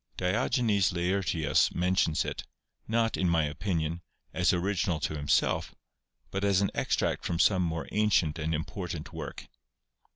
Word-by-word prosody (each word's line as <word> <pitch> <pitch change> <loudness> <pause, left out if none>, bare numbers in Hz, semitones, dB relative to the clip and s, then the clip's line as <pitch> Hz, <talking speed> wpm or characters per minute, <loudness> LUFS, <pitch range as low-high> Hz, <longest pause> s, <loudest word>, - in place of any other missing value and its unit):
Diogenes 100 - +1
Laertius 90 -2 +1
mentions 90 -3 +1
it, - - -4 0.4
not, 115 0 +1
in 90 - +1
my 85 -2 +3
opinion, 80 +1 -2 0.3
as 90 -1 +3
original 90 -2 0
to 75 - -2
himself, 70 -2 +1 0.6
but 95 +1 -2
as 100 -2 +3
an 100 - +1
extract - - 0
from 85 - -1
some 95 +2 +4
more 80 -2 -2
ancient 95 -7 +2
and 80 +1 -1
important 80 0 -5
work. - - -7
90 Hz, 135 wpm, -29 LUFS, 80-100 Hz, 0.6 s, some